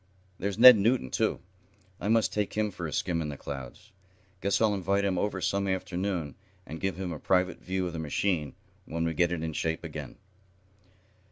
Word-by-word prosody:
There's 100 0 -2
Ned 125 0 +11
Newton, 110 - +1
too. - - 0 0.6
I - - -3
must 115 0 +2
take 105 -1 -1
him 105 -1 0
for 85 -3 -5
a - - -6
skim 85 0 -1
in 75 - -3
the 70 - -6
clouds. 70 - -8 0.5
Guess 100 - +1
I'll 110 -2 +3
invite 100 +1 0
him 95 -2 0
over 100 -2 -1
some 100 +1 0
afternoon, 95 -4 -2 0.3
and 80 - -8
give 95 -1 -1
him 95 -2 -3
a 75 - -7
private 90 -1 +1
view 95 0 -2
of 90 - -4
the 80 - -4
machine, 80 +1 -1 0.3
when 85 +1 -2
we 80 - 0
get 85 +1 +2
it 85 -2 -2
in 80 -1 -3
shape 80 +1 -2
again." - - -7
95 Hz, 195 wpm, -29 LUFS, 80-100 Hz, 0.6 s, Ned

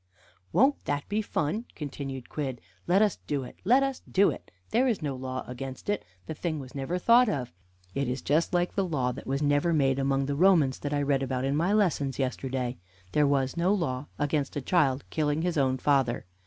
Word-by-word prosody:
"Won't 275 +4 +3
that 145 0 -2
be 210 +1 +1
fun?" 205 +3 -2
continued 135 -3 -6
Quidd. 135 -5 -4 0.3
"Let 190 +4 +5
us 210 -4 0
do 140 -2 -1
it 125 - -11
let 250 +8 +5
us 270 -1 -2
do 200 +2 +4
it. - - -9 0.2
There 250 +4 +3
is 225 -9 0
no 140 -3 -2
law 130 0 -4
against 130 +6 -7
it; 205 - -2 0.2
the - - -4
thing 160 0 -3
was 130 -2 -9
never 140 +6 -2
thought 235 +5 +5
of. 125 - -3 0.4
It 140 -1 -1
is 125 +2 -3
just 155 +4 +2
like 175 -1 +1
the 195 - +1
law 140 -8 0
that - - -9
was 135 +2 -1
never 145 +4 +2
made 135 -3 +2
among 135 0 +1
the 140 - -1
Romans 155 -4 +4
that 145 - -4
I 145 -1 +1
read 140 -1 +1
about 130 -1 -1
in 135 +1 0
my 170 +6 +1
lessons 170 -10 +1
yesterday: 130 -1 -2 0.3
there 150 -1 +3
was 135 -2 +1
no 175 +3 +2
law 145 -7 -2
against 145 -1 -1
a - - 0
child 140 -4 +2
killing 150 0 0
his 175 -1 0
own 130 -3 +2
father. 130 -5 +1
145 Hz, 210 wpm, -28 LUFS, 135-175 Hz, 0.4 s, Let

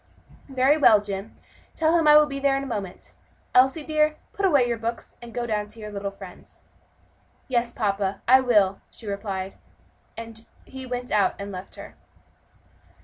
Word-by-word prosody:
"Very 265 +3 +3
well, 220 -8 +6
Jim, 200 +1 -6 0.4
tell 325 +1 +2
him 325 -2 +3
I 300 0 +9
will 300 - +6
be 275 -2 -5
there 275 -1 +2
in 275 - -3
a - - -5
moment. 205 -8 -6 0.4
Elsie, 265 +5 +4
dear, 305 0 +1 0.2
put 395 -1 +1
away 280 -8 +3
your 235 -1 -2
books, 230 +1 -5
and 240 -1 -10
go 240 +1 -3
down 210 -2 -2
to 215 +2 -14
your 210 -1 -7
little 200 -1 -4
friends." 195 -2 -13 0.8
"Yes, 240 -2 0
papa, 200 -4 -2
I 260 +2 +7
will," 205 -6 +2
she 230 - -13
replied, 200 -2 -5 0.6
as 225 0 -9 0.2
he 265 -1 -9
went 245 0 -5
out 205 -2 +2
and 200 0 -6
left 185 0 -9
her. - - -11
235 Hz, 175 wpm, -24 LUFS, 200-270 Hz, 0.8 s, I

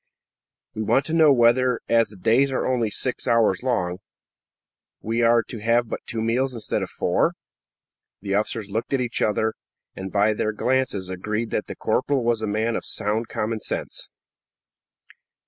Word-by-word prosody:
"We 110 - -4
want 135 +5 +2
to 160 - -4
know 160 -3 +6
whether, 125 0 +3
as 115 -1 +3
the 105 - -13
days 120 +8 +2
are 130 - -1
only 120 -4 +1
six 125 +5 -1
hours 115 -5 +3
long, 90 -8 -1 1.0
we 115 +2 -1
are 115 0 +4
to 115 - -8
have 115 +2 +1
but - - -3
two 115 - -3
meals 125 +3 0
instead 115 - -2
of - - -4
four?" - - +1 0.9
The 100 0 -4
officers 105 +1 -1
looked 115 +6 -3
at 135 - +2
each 120 -2 -2
other, 110 +1 +1 0.4
and 95 0 -6
by 105 +1 +3
their 110 +1 -1
glances 125 -5 0
agreed 105 +5 -3
that 105 - -2
the - - -6
corporal 130 +4 0
was 115 -1 +1
a 110 - -2
man 110 +3 0
of - - -3
sound 110 +3 0
common 110 +1 -2
sense. - - -5
115 Hz, 170 wpm, -23 LUFS, 105-125 Hz, 1.0 s, know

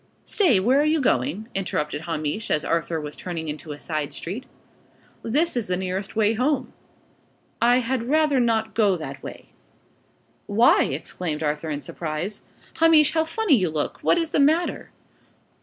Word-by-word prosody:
"Stay! 330 - +3
Where 255 +9 +3
are - - +2
you 310 +1 +2
going?" 250 -4 0
interrupted 150 -6 -2
Hamish, 160 +4 -3
as 150 - +1
Arthur 165 0 -1
was 150 -1 -6
turning 165 -3 -5
into 150 +1 -6
a 145 - -6
side 155 -1 -4
street. 205 +10 -6 0.7
"This 300 +9 0
is 240 -3 -1
the 180 0 0
nearest 190 +2 -4
way 215 0 +3
home." 260 +3 0 0.9
"I 245 +2 +4
had 245 0 -2
rather 305 -2 +3
not 225 -2 +1
go 205 -5 +3
that 140 -4 -7
way." - - -10 1.0
"Why?" 220 +4 +4
exclaimed 155 +2 -3
Arthur, 150 +1 -2
in 145 -1 -3
surprise. 170 +8 -4 0.4
"Hamish, 320 -2 +5
how 320 -1 +2
funny 400 +1 +1
you 185 -7 +1
look! 155 -2 -3
What - - +3
is 330 -2 -1
the - - +1
matter?" 315 +5 +2
210 Hz, 160 wpm, -24 LUFS, -, 1.0 s, Hamish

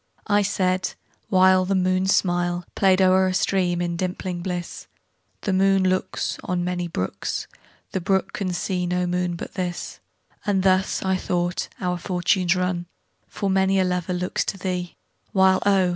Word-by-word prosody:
I 205 -1 +3
said 185 -2 0 0.4
(whileThe 185 0 +4
moon's 185 +1 +2
smilePlay'd 175 +1 +1
o'er 185 0 +4
a 185 - -1
stream, 180 -2 +1
in 170 -1 -2
dimpling 180 0 -3
bliss),The 180 +2 -6
moon 195 0 +3
looksOn 185 -1 -1
many 180 0 -2
brooks, 95 - -3 0.5
The 190 - -2
brook 190 +2 0
can 195 -3 -2
see 180 0 -2
no 180 0 0
moon 180 0 -1
but - - -7
this; 180 -1 -4 0.4
And 195 -3 +1
thus, 190 0 +2
I 190 -1 +1
thought, 175 -1 -1
our 180 -2 -1
fortunes 180 0 +1
run, 180 -1 -1 0.4
For 200 - -3
many 190 0 +3
a - - +4
lover 180 -1 -1
looks 180 0 -1
to 195 - -3
thee, 180 -2 -3 0.4
While 190 -1 +4
oh! 190 -2 +4
185 Hz, 145 wpm, -23 LUFS, 180-190 Hz, 0.5 s, whileThe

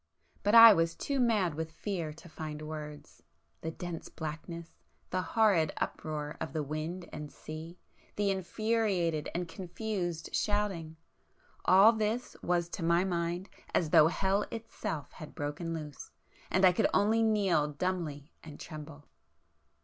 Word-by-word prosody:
But 205 +3 +3
I 230 -1 +12
was 165 -2 +1
too 280 -1 -2
mad 215 -9 +2
with 160 +1 -4
fear 170 -3 -3
to 165 +3 -13
find 155 -2 -6
words;—the 150 +1 -9
dense 170 0 -6
blackness,—the 165 +3 -6
horrid 185 -4 +3
uproar 150 -1 -3
of 160 -4 -4
the 155 - -1
wind 155 +5 -4
and 150 -1 -6
sea,—the 170 +5 -5
infuriated 190 -4 0
and 175 0 -1
confused 180 -1 -4
shouting,—all 195 +1 +1
this 220 +3 -2
was 175 -1 +1
to 170 - -5
my 170 +2 +3
mind 175 0 -2 0.3
as 160 -4 +1
though 160 -3 +8
hell 195 +4 +1
itself 165 - -5
had 155 - -11
broken 150 +4 -3
loose, 150 -3 -6 0.4
and 190 +1 +4
I 185 - +8
could - - +3
only 220 +3 +3
kneel 200 -9 +3
dumbly 155 -3 -3
and 150 -2 -10
tremble. 150 -1 -9
170 Hz, 130 wpm, -31 LUFS, 155-195 Hz, 0.4 s, I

